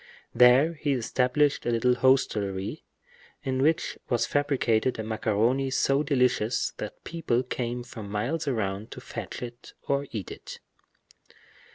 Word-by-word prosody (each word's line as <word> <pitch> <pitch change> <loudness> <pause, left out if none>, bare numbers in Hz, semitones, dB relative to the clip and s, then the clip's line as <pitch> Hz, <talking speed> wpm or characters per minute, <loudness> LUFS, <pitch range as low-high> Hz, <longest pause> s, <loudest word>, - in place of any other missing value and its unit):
There 125 +6 +6
he 145 -2 -1
established 130 +4 +1
a - - -1
little 120 +1 +3
hostelry, 110 -3 +1 0.6
in 130 -1 -1
which 155 +3 +1
was 120 -2 +2
fabricated 130 -4 +1
a 110 - -3
macaroni 115 +4 +1
so 135 +1 +2
delicious 125 -5 +1
that - - -7
people 145 -7 -1
came 125 -1 -3
from 115 -4 -9
miles 125 +10 -2
round 105 -5 -2
to - - -9
fetch - - -7
it 120 0 -9
or 140 0 0
eat 105 -5 -5
it. - - -9
125 Hz, 135 wpm, -27 LUFS, 110-140 Hz, 0.6 s, There